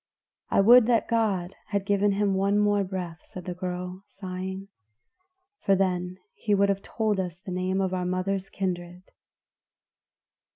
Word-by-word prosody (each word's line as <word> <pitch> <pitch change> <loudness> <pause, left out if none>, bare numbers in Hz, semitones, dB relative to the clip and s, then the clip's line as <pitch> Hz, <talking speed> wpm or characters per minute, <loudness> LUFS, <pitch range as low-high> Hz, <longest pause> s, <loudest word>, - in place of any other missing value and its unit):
"I - - +4
would 235 +3 +8
that 235 -2 +3
God 200 -6 0
had 200 -1 -1
given 205 0 +2
him 200 0 +1
one 195 +2 +2
more 205 -1 +3
breath," 180 -3 -5
said 180 -2 -9
the 180 - -3
girl 180 +1 -5
sighing, 190 0 -6 0.9
"for 195 - +3
then 180 -1 0 0.3
would 200 -1 +4
he - - +5
have 195 - -11
told 215 -2 -1
us 180 -2 -3
the 190 0 -9
name 185 +1 -1
of 190 -1 0
our 180 -1 -1
mother's 185 +1 -1
kindred." 180 -1 -4
190 Hz, 155 wpm, -27 LUFS, 180-200 Hz, 0.9 s, would